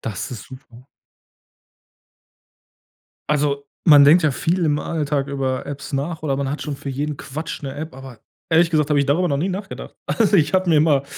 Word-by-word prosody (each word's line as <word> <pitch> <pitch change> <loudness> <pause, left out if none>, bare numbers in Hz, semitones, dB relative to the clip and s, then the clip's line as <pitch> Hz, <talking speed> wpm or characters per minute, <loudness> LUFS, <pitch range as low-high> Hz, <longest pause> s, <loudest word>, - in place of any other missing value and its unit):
Das 105 -4 -5
ist 115 -5 -7
super. 130 -1 -14 2.4
Also, 140 -1 0 0.2
man 145 -3 +8
denkt 160 +4 +6
ja 150 - +3
viel 170 +6 0
im 150 -1 +1
Alltag 145 -3 -2
über 135 -2 -2
Apps 140 0 -7
nach 155 +4 -3
oder 135 -2 0
man 135 -1 -2
hat 145 - -4
schon 150 -2 -4
für 140 - -8
jeden 145 +2 -3
Quatsch 155 +5 -6
'ne 135 -1 -5
App, 155 0 -6
aber 135 -3 -11 0.3
ehrlich 165 +1 +4
gesagt 155 -2 +1
habe 145 - +3
ich 140 - +1
darüber 175 +5 +2
noch 140 - 0
nie 170 +7 -1
nachgedacht. 195 +1 -6
Also 215 -3 +2
ich 155 -3 +2
habe 185 -1 +2
mir 160 -3 +5
immer, 150 -3 +3
145 Hz, 195 wpm, -21 LUFS, 140-160 Hz, 2.4 s, man